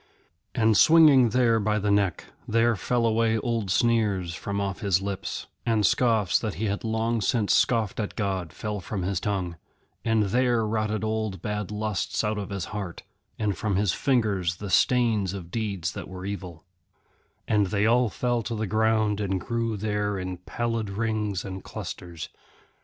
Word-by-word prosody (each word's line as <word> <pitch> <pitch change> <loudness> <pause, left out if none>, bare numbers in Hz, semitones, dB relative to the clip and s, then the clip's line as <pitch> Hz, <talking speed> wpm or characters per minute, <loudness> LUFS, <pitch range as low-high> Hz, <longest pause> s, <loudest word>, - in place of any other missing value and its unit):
And 110 -2 +3
swinging 145 - +7
there 115 -1 +3
by 105 0 +1
the 105 0 0
neck, 100 -4 +1 0.2
there 115 +1 +3
fell 120 +4 0
away 115 0 +2
old 115 -3 -2
sneers 100 -4 +1
from 100 +3 -4
off 100 -1 -2
his 100 -5 +2
lips, 100 0 -4 0.2
and 110 -3 +2
scoffs 110 -7 +3
that 110 -3 -3
he 110 - -2
had 100 -1 -2
long 110 0 0
since 105 0 +1
scoffed 115 -4 +1
at 105 - -3
God 95 -6 -2
fell 105 -1 -4
from 95 +1 -4
his 95 -1 -1
tongue, 90 -5 -2 0.5
and 115 -2 +2
there 120 +2 +2
rotted 110 0 -1
old 110 -4 -2
bad 105 -2 -3
lusts 105 0 -2
out 105 -1 -1
of 100 - -5
his 100 -3 -3
heart, 95 -5 -5 0.3
and 105 -3 0
from 105 -4 -1
his 100 -2 +2
fingers 105 -10 +1
the 100 +1 -7
stains 110 -7 +2
of 85 -3 -8
deeds 100 -5 -2
that - - -7
were 95 0 -8
evil; 95 -5 -6 0.8
and 105 -2 +2
they 100 +2 +1
all 120 +1 +4
fell 120 +3 -1
to 115 +1 -4
the 110 0 -2
ground 110 0 +1
and 95 -2 -1
grew 115 +1 -2
there 105 -1 -1
in 90 -1 -4
pallid 115 +3 -3
rings 105 -2 -2
and 95 -1 -6
clusters. 85 -3 -7
105 Hz, 170 wpm, -26 LUFS, 95-115 Hz, 0.8 s, swinging